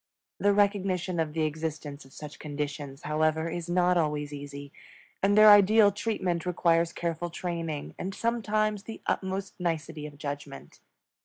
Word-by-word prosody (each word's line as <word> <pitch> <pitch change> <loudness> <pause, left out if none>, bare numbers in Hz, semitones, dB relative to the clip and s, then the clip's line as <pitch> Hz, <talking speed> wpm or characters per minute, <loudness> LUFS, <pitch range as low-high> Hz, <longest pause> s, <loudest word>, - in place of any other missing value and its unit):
The 205 - +4
recognition 195 -3 +1
of 155 -2 -1
the 160 0 0
existence 155 -2 -4
of 135 - -18
such 150 +2 -10
conditions, 145 -1 -5
however, 155 +1 +1
is 175 +1 -5
not 180 0 +3
always 150 -2 -1
easy, 140 0 -8 0.5
and 200 +1 +3
their 215 0 +10
ideal 205 +1 +7
treatment 190 -5 -2
requires 170 -1 +2
careful 170 0 -3
training 165 -3 -4
and 190 +1 -4
sometimes 215 -3 0
the 225 - -8
utmost 190 0 -2
nicety 160 -3 -3
of 145 -1 -13
judgment. 145 - -7
165 Hz, 145 wpm, -28 LUFS, 150-195 Hz, 0.5 s, their